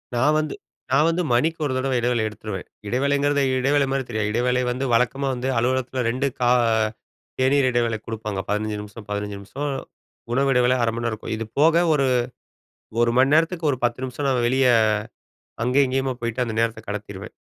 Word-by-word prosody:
நான் 145 +6 +3
வந்து 155 -1 -3 0.4
நான் 140 +4 +4
வந்து 170 +2 0
மணிக்கு 160 +8 +1
ஒரு 135 - -1
தடவ 130 +1 -1
இடைவேளை 120 -1 +1
எடுத்துருவேன், 105 -3 -6 0.2
இடைவேளைங்கிறது 140 +4 +1 0.2
இடைவேளை 140 +2 +2
மாரி 135 0 0
தெரியாது, 110 -2 -1
இடைவேளை 125 +3 +1
வந்து 125 +2 -2
வழக்கமா 125 +4 +1
வந்து 125 +1 -3
அலுவலகத்தில 130 +1 0
2 130 +4 0
கா 120 - +3 0.9
தேநீர் 130 0 +3
இடைவேளை 120 -2 +1
குடுப்பாங்க, 110 -3 -4
15 105 0 -1
நிமிஷம் 105 +1 -11
15 105 0 -3
நிமிஷம், 140 +9 -5 0.6
உணவு 135 +2 +2
இடைவேளை 125 0 +3
1/2 115 -1 +2
மணிநேரம் 115 -1 -2
இருக்கும். 110 0 -5
இது 115 -1 -5
போக 160 +2 +5 0.2
ஒரு 140 -3 +2 0.9
1 120 0 +3
மணிநேரத்துக்கு 160 +5 +3
ஒரு 130 - -2
10 120 +1 0
நிமிஷம் 135 +2 -3
நான் 125 -2 +1
வெளியே 130 0 +3 0.9
அங்கேயும் 130 +3 +3
இங்கேயுமா 130 0 0
போயிட்டு 120 +1 -1
அந்த 115 - -4
நேரத்தை 115 -1 -1
கடத்திருவேன். 100 -1 -6
125 Hz, 165 wpm, -23 LUFS, 115-135 Hz, 0.9 s, போக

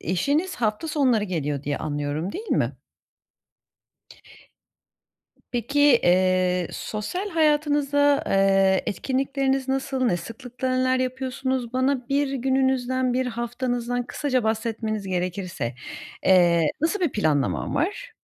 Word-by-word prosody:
eşiniz 285 - 0
hafta 220 +7 -1
sonları 255 -8 +2
geliyor 150 -6 -3
diye 145 0 -2
anlıyorum 145 +4 -3
değil 440 +3 -7
mi? - - +1 2.8
Peki, 245 +4 -1
eee, 185 - +3
sosyal 360 - -4
hayatınızda, 290 -3 +2
eee, 195 -1 +3
etkinlikleriniz 270 +3 -1
nasıl? 265 0 -1
Ne 175 -6 +2
sıklıkla 250 +5 -4
neler 255 0 +2
yapıyorsunuz? 255 -1 -2
Bana 260 0 0
1 280 0 +1
gününüzden, 260 -1 +1
1 260 +1 0
haftanızdan 245 0 -2
kısaca 255 -1 -1
bahsetmeniz 220 -2 -2
gerekirse, 180 -8 -3 0.5
eee, 175 -3 +5 0.2
nasıl 335 +5 +1
bir 340 -7 +1
planlaman 140 - 0
var? - - -2
245 Hz, 105 wpm, -24 LUFS, 190-270 Hz, 2.8 s, eee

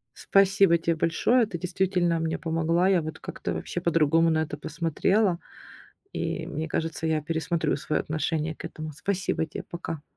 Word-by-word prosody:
Спасибо 195 -3 +4
те 165 0 0
большое. 225 +9 +3
Ты 180 -5 -5
действительно 180 -1 0
мне 160 0 -1
помогла. 165 +2 +1
Я 185 -3 +4
вот 155 0 -6
как-то - - -5
вообще 175 - -4
по-другому 165 -1 +3
на 160 -1 +2
это 150 -1 -6
посмотрела. 170 +5 +1 0.7
И - - -3
мне 155 +2 -4
кажется, 160 0 -2
я 155 -2 +1
пересмотрю 165 +1 -1
свое 150 +2 -1
отношение 155 0 -2
к - - -12
этому. 155 0 -6
Спасибо 180 +1 -1
те. 150 - -7
Пока. 165 -3 -6
165 Hz, 160 wpm, -26 LUFS, 160-180 Hz, 0.7 s, Спасибо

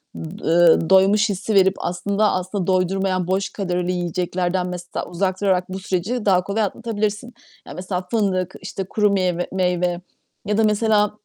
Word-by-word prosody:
ımm, - - -7 0.2
ııı, 165 -1 +4
doymuş 200 +3 +5
hissi 200 +2 -2
verip 190 0 +5
aslında, 200 +4 0
aslında 185 0 -2
doydurmayan 185 0 0
boş 190 +1 0
kalorili 180 -2 -2
yiyeceklerden 180 +1 -1
mesela 180 -1 -5
uzak 185 +2 -2
durarak 185 -3 +1
bu 190 +1 -5
süreci 195 +5 -2
daha 185 -3 +3
kolay 200 +3 -1
atlatabilirsin. 215 +2 -3 0.3
Ya, - - -8
mesela 180 0 -3
fındık, 190 -5 0
işte, 195 +1 -5
kuru 210 +2 +1
meyve 180 -3 0
meyve 180 -1 0 0.4
ya 210 0 0
da 225 - +3
mesela 210 -1 +2
190 Hz, 155 wpm, -21 LUFS, 180-205 Hz, 0.4 s, doymuş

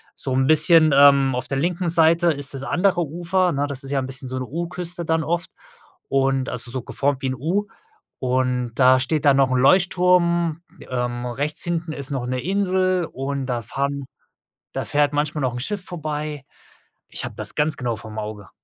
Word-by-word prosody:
so 130 - -4
'n 130 0 +2
bisschen, 155 +1 +6
ähm, 140 -1 +6
auf 125 0 -3
der 135 - -2
linken 175 +4 -1
Seite 165 +1 +4
ist 145 -1 -3
das 135 -1 -6
andere 180 +4 +1
Ufer, 175 +3 0
'ne? 140 +1 0
Das 140 -1 -3
ist 135 - -7
ja 140 - +1
'n 130 - -3
bisschen 130 0 -6
so 130 +1 -4
'ne 130 - -3
U-Küste 170 +3 -5
dann 160 0 +1
oft 170 +2 -2 0.6
und 135 -1 +1
also 120 0 -5
so 130 +2 -2
geformt 140 +2 -1
wie - - -1
'n 130 - -2
U 170 +11 -1 0.5
und 125 -1 0
da 130 0 +5
steht 150 +3 -1
da 140 -2 +6
noch 135 -1 +3
'n 130 - +2
Leuchtturm, 170 +1 +3 0.3
ähm, 120 -1 -2
rechts 145 +5 -3
hinten 170 -1 -2
ist 140 -2 -7
noch 130 -3 -2
'ne 130 0 -2
Insel 185 0 +1
und 135 +1 -3
da 120 -2 -2
fahren 140 +3 -3 0.7
da - - -3
fährt 145 0 +1
manchmal 150 +1 -1
noch 125 -2 0
'n 125 - -4
Schiff 190 +8 -4
vorbei. 150 -4 -5 0.7
Ich - - -3
habe - - -6
das - - -2
ganz 150 0 +1
genau 120 -2 -2
vorm 110 +1 -9
Auge. 105 -2 -6
140 Hz, 195 wpm, -22 LUFS, 130-170 Hz, 0.7 s, bisschen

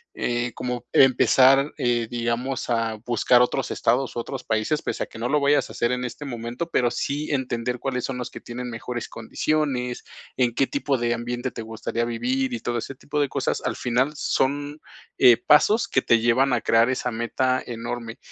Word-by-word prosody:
eh, 120 0 -1
como 125 -1 -4
empezar, 135 +2 +5
eh, 120 -2 0
digamos, 120 +2 -2
a 115 -1 0
buscar 120 +1 +4
otros 130 +1 -1
estados, 130 -1 0
u - - -2
otros 130 +2 -5
países, 110 +7 0
pese - - -3
a - - -4
que - - -12
no 120 +2 -2
lo 150 +2 +3
vayas 145 +1 +2
a - - -9
hacer 120 0 0
en 125 0 -2
este 125 +4 -6
momento, 120 +4 -5
pero 120 -1 +2
sí 145 +2 -3
entender 125 -3 -2
cuáles 125 -1 -2
son 135 - -4
los 125 - -5
que - - -9
tienen 125 +1 -6
mejores 120 +1 -5
condiciones, 125 +1 -2 0.3
en 120 -2 +1
qué 135 - +3
tipo 140 -1 -1
de 120 0 0
ambiente 120 +2 -3
te - - -7
gustaría 115 +1 -3
vivir, 255 - -1
y 245 - -2
todo 120 0 -2
ese 135 - -7
tipo 145 +3 -3
de 140 - +1
cosas, 135 -1 -1
al - - -1
final 125 +4 +1
son, 145 +1 -1 0.4
eh, 125 -3 +7
pasos 210 +9 +4
que 130 - +1
te 115 - +3
llevan 125 +4 +3
a 120 - +1
crear 115 +2 +3
esa 130 -1 -1
meta 130 +3 0
enorme. 115 0 -5
125 Hz, 195 wpm, -24 LUFS, 120-135 Hz, 0.4 s, eh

